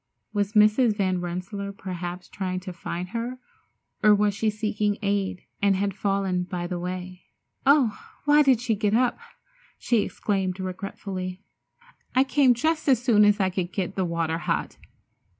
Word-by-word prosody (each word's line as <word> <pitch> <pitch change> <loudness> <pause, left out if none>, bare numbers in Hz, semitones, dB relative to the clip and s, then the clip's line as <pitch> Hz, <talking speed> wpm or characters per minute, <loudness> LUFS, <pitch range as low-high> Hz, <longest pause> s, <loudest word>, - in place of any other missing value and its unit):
Was 205 0 0
Mrs. 215 +1 +4
Van 185 -3 0
Rensselaer 185 +3 -4
perhaps 180 -2 -6
trying 185 -2 -3
to 185 -1 -7
find 175 +1 -5
her, 235 +4 -4 0.6
or 210 -1 +6
was 205 0 +2
she 215 +2 0
seeking 210 -1 -1
aid, 200 -2 -1 0.2
and 200 -1 +4
had 200 +1 0
fallen 195 -2 0
by 175 -1 -4
the 175 0 -3
way? 180 +1 -6 0.4
"Oh, 270 -7 +4 0.3
why 295 0 +6
did 265 -5 +4
she 240 -2 +1
get 210 0 +1
up!" 250 - +2 0.6
she 235 -3 +2
exclaimed 190 -3 -2
regretfully. 185 0 -5 0.7
"I 260 - +6
came 270 -2 +4
just 310 +4 0
as 260 - +5
soon 230 -4 +4
as 205 0 +4
I 190 -1 +2
could 180 -1 -2
get 190 -1 -2
the 190 - 0
water 165 -1 -1
hot!" - - -2
200 Hz, 160 wpm, -25 LUFS, 185-220 Hz, 0.7 s, or